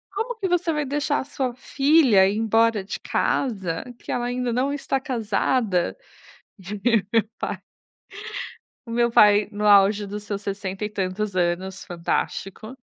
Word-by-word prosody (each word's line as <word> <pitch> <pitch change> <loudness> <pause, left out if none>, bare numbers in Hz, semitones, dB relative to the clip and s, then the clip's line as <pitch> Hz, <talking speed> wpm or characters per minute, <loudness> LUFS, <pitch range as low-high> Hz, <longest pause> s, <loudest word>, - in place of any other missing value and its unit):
"Como 455 +3 -3
que 400 - -1
você 350 -1 +1
vai 300 -1 -1
deixar 290 +1 0
a - - -5
sua 265 -3 -3
filha 270 -6 +4
ir 200 - -1
embora 225 -1 +2
de 195 - -6
casa, 195 -11 -1 0.2
que - - -7
ela 240 0 -1
ainda 245 0 -2
não 260 +4 0
está 275 -1 -2
casada". 225 - 0 1.2
Meu 225 -2 +2
pai - - -4 1.3
o - - -9
meu 235 +1 +2
pai, 210 -2 +5
no 210 +1 -2
auge 205 0 +5
dos 205 +1 -6
seus 205 -1 -4
60 195 0 -4
e 210 - -3
tantos 200 0 -3
anos, 185 +2 -1
fantástico, 195 +6 -3
220 Hz, 150 wpm, -23 LUFS, 195-260 Hz, 1.3 s, pai